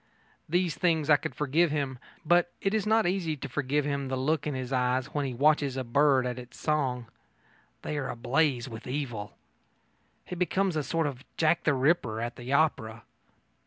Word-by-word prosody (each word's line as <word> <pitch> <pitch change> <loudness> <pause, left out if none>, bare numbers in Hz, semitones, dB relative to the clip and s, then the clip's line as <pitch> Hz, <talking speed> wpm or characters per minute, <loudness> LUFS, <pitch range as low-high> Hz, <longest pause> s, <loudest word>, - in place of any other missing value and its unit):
These 175 0 +1
things 160 -4 +1
I - - +9
could 155 +2 -4
forgive 150 +4 +2
him, 140 -4 -2 0.3
but 175 +2 +3
it 195 - -1
is 215 -1 0
not 220 0 +3
easy 175 -4 -1
to 140 - -6
forgive 145 +2 -1
him 140 -2 -2
the 130 - -2
look 150 +3 0
in 145 - -2
his 130 0 -4
eyes 125 +1 0
when 145 -2 -1
he 130 - -4
watches 140 0 +2
a 130 - -1
bird 135 +1 +3
at 125 0 -3
its 125 0 -12
song. 135 -6 0 0.8
They 150 - -2
are 140 - -3
ablaze 130 +1 0
with 115 -1 -9
evil. 125 -6 -4 0.9
He - - -7
becomes 180 +1 0
a 155 - +1
sort 165 +2 -1
of 140 -2 -4
Jack 165 +2 +2
the 150 - +3
Ripper 130 -5 +1
at 120 +1 -4
the 120 +1 -7
opera. 115 -7 +1
145 Hz, 190 wpm, -28 LUFS, 130-160 Hz, 0.9 s, I